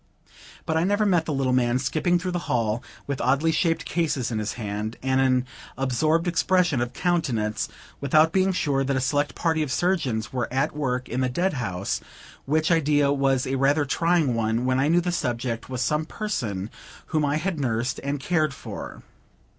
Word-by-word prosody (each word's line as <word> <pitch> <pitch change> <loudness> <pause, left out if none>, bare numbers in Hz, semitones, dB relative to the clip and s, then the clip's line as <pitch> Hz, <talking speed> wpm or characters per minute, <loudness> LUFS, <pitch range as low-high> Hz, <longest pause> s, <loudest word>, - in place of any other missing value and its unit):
But 160 - 0
I 160 - +2
never 205 +3 +2
met 175 -5 +3
the 160 - -2
little 135 -2 +1
man 125 -1 +2
skipping 155 +7 +1
through 180 +1 -3
the 175 - -1
hall, 115 -1 +1 0.2
with 140 -1 -3
oddly 140 +6 +2
shaped 165 +1 +1
cases 145 -8 -1
in 110 - -1
his 105 0 -2
hand, 105 0 -4
and 130 0 +2
an 130 -1 +2 0.3
absorbed 155 +6 +1
expression 175 -4 +2
of 120 +1 -2
countenance, 120 - 0 0.3
without 155 +3 +4
being 190 +1 +2
sure 140 -6 0
that 135 0 0
a - - +1
select 145 +1 0
party 160 -2 +1
of 150 -4 -2
surgeons 130 -11 0
were 120 -3 -2
at 135 +4 0
work 130 -4 -1
in 125 +2 -2
the 130 - +1
dead 175 +9 0
house, 100 -8 -2 0.4
which 155 +4 +1
idea 145 -3 +3
was 135 -2 +2
a 135 +1 -1
rather 145 +3 +3
trying 165 -2 +2
one, 115 +1 0
when 130 0 +2
I 140 - +2
knew 170 +3 +4
the 175 +1 -1
subject 120 -7 -2
was 130 -1 -2
some 150 +3 0
person 115 - -3 0.4
whom 155 -1 +2
I 145 0 +1
had 165 +1 -2
nursed 120 -2 -1
and 140 +1 -2
cared 155 -2 0
for. - - -8
140 Hz, 190 wpm, -25 LUFS, 125-160 Hz, 0.4 s, without